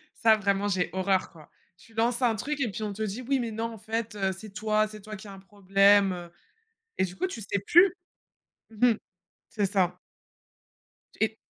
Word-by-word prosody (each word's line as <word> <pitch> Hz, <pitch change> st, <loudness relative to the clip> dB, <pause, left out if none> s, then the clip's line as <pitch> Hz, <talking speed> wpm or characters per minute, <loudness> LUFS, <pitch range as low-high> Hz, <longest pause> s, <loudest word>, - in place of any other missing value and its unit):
ça 225 Hz, -1 st, +5 dB
vraiment 200 Hz, -1 st, 0 dB
j'ai 185 Hz, -3 st, 0 dB
horreur 190 Hz, 0 st, 0 dB
quoi. 155 Hz, -4 st, -16 dB, 0.3 s
Tu 225 Hz, +6 st, -20 dB
lances 235 Hz, +2 st, +1 dB
un 235 Hz, -3 st, +3 dB
truc 290 Hz, +7 st, -3 dB
et 245 Hz, -, 0 dB
puis 215 Hz, +2 st, -5 dB
on 210 Hz, -1 st, -3 dB
te 215 Hz, -, -8 dB
dit: 215 Hz, +4 st, -4 dB
«Oui, 275 Hz, -1 st, +2 dB
mais 230 Hz, -2 st, -3 dB
non 225 Hz, +1 st, -3 dB
en -, -, -9 dB
fait, 225 Hz, +1 st, -4 dB
heu, 195 Hz, -1 st, 0 dB
c'est 200 Hz, +2 st, -8 dB
toi 215 Hz, +1 st, +1 dB
c'est 215 Hz, -1 st, -10 dB
toi 215 Hz, +1 st, -8 dB
qui 210 Hz, +1 st, -11 dB
as 200 Hz, -, -9 dB
un 195 Hz, -, -11 dB
problème» 195 Hz, 0 st, +4 dB
heu 175 Hz, -1 st, -8 dB, 0.7 s
et 190 Hz, -, +2 dB
du 180 Hz, 0 st, -9 dB
coup, -, -, -1 dB
tu 235 Hz, -, -7 dB
sais 200 Hz, -1 st, -1 dB
plus. 355 Hz, +2 st, +6 dB, 0.8 s
Mmh 225 Hz, +3 st, +3 dB
mh. -, -, -4 dB, 0.5 s
C'est 205 Hz, -2 st, 0 dB
ça. 190 Hz, -3 st, +1 dB, 1.2 s
Et 220 Hz, 0 st, +1 dB
210 Hz, 210 wpm, -27 LUFS, 195-225 Hz, 1.2 s, plus